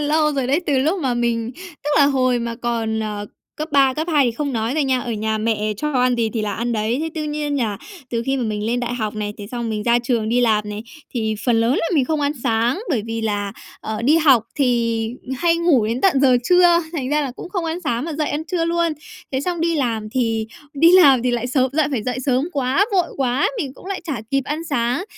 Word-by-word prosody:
lâu 300 Hz, +1 st, +2 dB
rồi 270 Hz, -3 st, -1 dB
đấy, 280 Hz, +6 st, +2 dB
từ 280 Hz, -3 st, +2 dB
lúc 315 Hz, +8 st, +1 dB
mà 260 Hz, -5 st, 0 dB
mình 235 Hz, -1 st, -1 dB, 0.3 s
tức 295 Hz, -, -1 dB
là 285 Hz, -, +6 dB
hồi 255 Hz, -3 st, +2 dB
mà 235 Hz, 0 st, -3 dB
còn, 225 Hz, -2 st, -2 dB
ờ, 210 Hz, -1 st, -4 dB, 0.3 s
cấp 310 Hz, +1 st, -4 dB
3, 270 Hz, -2 st, +4 dB
cấp 315 Hz, +4 st, -3 dB
2 290 Hz, -3 st, +4 dB
thì 240 Hz, -, +2 dB
không 285 Hz, +3 st, -3 dB
nói 225 Hz, +2 st, -1 dB
rồi 305 Hz, -2 st, +1 dB
nha, 260 Hz, -1 st, +1 dB
ở 240 Hz, -1 st, -4 dB
nhà 220 Hz, 0 st, -1 dB
mẹ 215 Hz, -1 st, 0 dB
cho 300 Hz, +6 st, -2 dB
ăn 250 Hz, -1 st, +2 dB
gì 230 Hz, -2 st, 0 dB
thì 220 Hz, -, -1 dB
là 210 Hz, -, -2 dB
ăn 235 Hz, +2 st, -2 dB
đấy. 220 Hz, +3 st, 0 dB
Thế 320 Hz, -, -2 dB
tuy 310 Hz, -2 st, -3 dB
nhiên 295 Hz, -1 st, -2 dB
nhà 225 Hz, -7 st, -1 dB, 0.3 s
từ 230 Hz, -1 st, -1 dB
khi 270 Hz, 0 st, +1 dB
mà 255 Hz, -, -1 dB
mình 215 Hz, -2 st, -2 dB
lên 240 Hz, +2 st, 0 dB
đại 245 Hz, 0 st, -2 dB
học 220 Hz, -3 st, -3 dB
này, 210 Hz, -1 st, -3 dB
thế 205 Hz, -, -7 dB
xong 235 Hz, +1 st, -4 dB
mình 210 Hz, -1 st, -2 dB
ra 235 Hz, +2 st, +3 dB
trường 235 Hz, -2 st, -1 dB
đi 245 Hz, +2 st, +2 dB
làm 215 Hz, -3 st, +2 dB
này, 210 Hz, +1 st, -5 dB, 0.3 s
thì 220 Hz, -2 st, -1 dB
phần 235 Hz, -2 st, +3 dB
lớn 230 Hz, +2 st, +2 dB
là -, -, 0 dB
mình 280 Hz, -5 st, +3 dB
không 305 Hz, +3 st, -1 dB
ăn 285 Hz, 0 st, +1 dB
sáng 235 Hz, -, +1 dB
bởi 245 Hz, -8 st, +1 dB
vì 225 Hz, 0 st, -3 dB
là, 205 Hz, -2 st, -2 dB, 0.3 s
ờ, 220 Hz, +1 st, -4 dB
đi 290 Hz, +7 st, +4 dB
học 275 Hz, -9 st, +5 dB
thì 230 Hz, -4 st, +1 dB, 0.3 s
hay 335 Hz, +5 st, +2 dB
ngủ 320 Hz, -10 st, +3 dB
đến 230 Hz, +3 st, -2 dB
tận 345 Hz, -9 st, +3 dB
giờ 260 Hz, -3 st, +5 dB
trưa, 355 Hz, 0 st, +5 dB
thành 275 Hz, -7 st, -3 dB
ra 300 Hz, +1 st, +2 dB
là 275 Hz, -, -2 dB
cũng -, -, -8 dB
không 365 Hz, -2 st, -3 dB
ăn 330 Hz, +2 st, -3 dB
sáng 245 Hz, -6 st, -1 dB
mà 330 Hz, -, -4 dB
dậy 305 Hz, 0 st, -1 dB
ăn 295 Hz, +2 st, -2 dB
trưa 335 Hz, -1 st, -1 dB
luôn. 335 Hz, 0 st, +1 dB, 0.4 s
Thế 265 Hz, -, 0 dB
xong 345 Hz, +3 st, -2 dB
đi 335 Hz, 0 st, +1 dB
làm 230 Hz, -6 st, -1 dB
thì 225 Hz, -3 st, 0 dB, 0.3 s
đi 325 Hz, +4 st, +5 dB
làm 280 Hz, -10 st, +7 dB
thì 250 Hz, -, +1 dB
lại 240 Hz, 0 st, -1 dB
sớm, 255 Hz, 0 st, +1 dB
lại 305 Hz, 0 st, +2 dB
phải 250 Hz, -6 st, -1 dB
dậy 250 Hz, +2 st, -2 dB
sớm 265 Hz, +3 st, 0 dB
quá, 275 Hz, +7 st, +2 dB
vội 360 Hz, -3 st, +1 dB
quá, 260 Hz, 0 st, +1 dB
mình 275 Hz, -9 st, -3 dB
cũng -, -, -14 dB
lại 390 Hz, -1 st, -3 dB
chả 285 Hz, -10 st, -3 dB
kịp 275 Hz, 0 st, +1 dB
ăn 305 Hz, +3 st, -3 dB
sáng. 255 Hz, +1 st, -1 dB
255 Hz, 260 wpm, -20 LUFS, 230-300 Hz, 0.4 s, làm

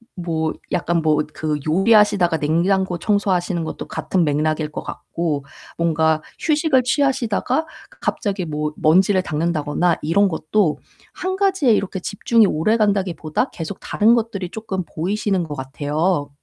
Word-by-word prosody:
뭐 165 Hz, -3 st, -2 dB, 0.2 s
약간 170 Hz, 0 st, 0 dB
뭐 155 Hz, -1 st, +2 dB, 0.2 s
그 155 Hz, -1 st, -2 dB
요리하시다가 195 Hz, -1 st, +4 dB
냉장고 175 Hz, +4 st, +1 dB
청소하시는 185 Hz, -3 st, 0 dB
것도 160 Hz, -, -6 dB
같은 185 Hz, -2 st, -1 dB
맥락일 155 Hz, +1 st, 0 dB
것 -, -, -6 dB
같고 155 Hz, -5 st, -3 dB, 0.3 s
뭔가 160 Hz, -2 st, +2 dB, 0.2 s
휴식을 305 Hz, -4 st, +2 dB
취하시다가 260 Hz, +1 st, 0 dB, 0.3 s
갑자기 195 Hz, -4 st, -2 dB
뭐 150 Hz, -1 st, -3 dB
먼지를 185 Hz, +4 st, +3 dB
닦는다거나 160 Hz, +1 st, 0 dB
이런 200 Hz, +7 st, +3 dB
것도 165 Hz, 0 st, 0 dB, 0.4 s
1 375 Hz, +1 st, -3 dB
가지에 380 Hz, -9 st, +2 dB
이렇게 200 Hz, -2 st, -1 dB
집중이 215 Hz, +4 st, +2 dB
오래간다기보다 195 Hz, -, 0 dB
계속 165 Hz, +3 st, -7 dB
다른 220 Hz, +2 st, +3 dB
것들이 220 Hz, -6 st, -1 dB
쪼끔 195 Hz, -3 st, -4 dB
보이시는 190 Hz, +3 st, -1 dB
것 150 Hz, -3 st, -6 dB
같아요. 145 Hz, +4 st, -1 dB
180 Hz, 320 characters per minute, -20 LUFS, 155-210 Hz, 0.4 s, 요리하시다가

